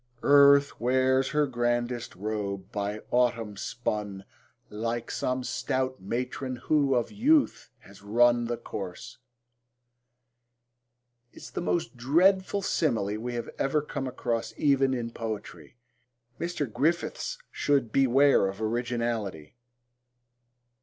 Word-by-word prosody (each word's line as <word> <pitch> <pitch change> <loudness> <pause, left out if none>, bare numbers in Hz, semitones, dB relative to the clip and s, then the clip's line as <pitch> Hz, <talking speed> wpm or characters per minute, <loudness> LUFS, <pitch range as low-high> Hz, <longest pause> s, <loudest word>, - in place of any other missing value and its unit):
Earth 140 0 +6
wears 130 +2 +2
her 150 -1 +2
grandest 120 -1 -2
robe, 100 -1 -4
by 105 -1 -3
autumn 115 -4 +1
spun, 105 -4 -4 0.5
Like 115 +2 -3
some 130 0 -1
stout 130 -1 -2
matron 125 +5 -3
who 140 +1 +1
of 120 - 0
youth 275 +8 +2
has 100 0 -16
run 120 +3 +3
The 120 0 -2
course,... 100 +5 -7 2.1
is - - -11
the - - -4
most 170 -5 -1
dreadful 185 +9 +3
simile 110 - 0
we 120 +1 -4
have 120 - -4
ever 145 +2 +1
come 140 -3 -4
across 120 -2 -3
even 135 -2 +3
in 115 -1 -4
poetry. 110 - -7 0.6
Mr. 170 -3 -2
Griffiths 160 - -1
should 135 -6 +1
beware 135 -3 +4
of 95 +1 -6
originality. 115 -6 -2
120 Hz, 110 wpm, -28 LUFS, 110-140 Hz, 2.1 s, Earth